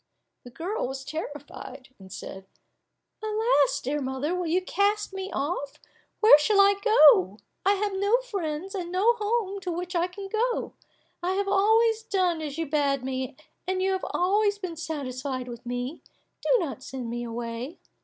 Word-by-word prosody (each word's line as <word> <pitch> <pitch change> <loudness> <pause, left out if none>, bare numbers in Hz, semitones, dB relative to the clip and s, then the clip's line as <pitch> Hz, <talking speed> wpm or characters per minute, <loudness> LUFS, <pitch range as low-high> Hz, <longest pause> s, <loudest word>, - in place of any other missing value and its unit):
The 245 - -10
girl 340 - -3
was 265 +1 -6
terrified, 290 -4 -7
and 190 -1 -13
said, 190 +1 -8 0.7
"Alas! 450 +3 +2
dear 290 +3 -1
mother, 265 +5 -2
will 360 -1 -2
you 360 +3 +1
cast 405 +2 0
me 385 0 -5
off? 285 -1 -3 0.4
Where 430 -9 +9
shall 400 +7 +3
I 400 0 +7
go? 290 - +6 0.3
I 395 - +4
have 405 0 -1
no 400 +4 +3
friends, 380 -7 -4
and 355 -3 -4
no 400 +6 +4
home 415 -2 -1
to 370 -2 -4
which 355 +2 -4
I 345 +1 +2
can 390 +2 -8
go. 465 +4 -1 0.5
I 360 +2 0
have 395 +1 -1
always 440 +3 +3
done 370 -6 0
as 300 -1 -5
you 330 - -1
bade 280 -2 +1
me, 260 0 -3 0.3
and 375 0 0
you 380 +1 +1
have 380 -1 -1
always 405 +3 +2
been 365 -4 -5
satisfied 270 -5 -4
with 240 0 -9
me; 245 +5 -4 0.4
do - - -3
not 310 - -3
send 260 -2 -6
me 240 +1 -3
away." 235 +5 -5
350 Hz, 170 wpm, -27 LUFS, 270-400 Hz, 0.7 s, Where